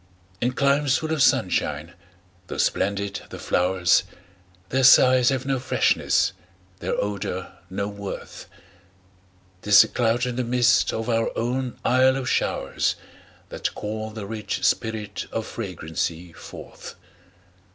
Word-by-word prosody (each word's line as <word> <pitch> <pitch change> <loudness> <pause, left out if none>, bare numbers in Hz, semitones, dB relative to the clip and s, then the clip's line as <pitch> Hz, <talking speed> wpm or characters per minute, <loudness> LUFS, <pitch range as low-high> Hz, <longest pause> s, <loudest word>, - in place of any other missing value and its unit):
In 125 +1 0
climes 140 0 +2
full 160 0 -3
of 155 - -1
sunshine, 90 - +1 0.5
tho' - - -6
splendid 100 0 -1
the - - -8
flowers, 90 0 +2 0.7
Their 130 +1 +1
sighs 130 -1 +7
have 130 -1 -1
no 135 -1 0
freshness, 130 - +1 0.5
their - - -2
odor 100 -1 -3 0.2
no 100 +2 -3
worth; 100 -1 -8 1.1
'Tis 105 -1 +7
the - - -5
cloud 120 0 0
and 125 0 -3
the - - +1
mist 120 0 +3
of 110 0 -4
our 115 -1 +1
own 125 +2 -2
Isle 130 +1 +4
of 130 -1 -4
showers, - - 0 0.5
That - - -4
call 110 +1 -4
the 110 -2 -7
rich 105 0 -4
spirit 110 -3 -1
of 115 - -3
fragrancy 85 -4 -5
forth. - - -11
115 Hz, 130 wpm, -24 LUFS, 100-130 Hz, 1.1 s, sighs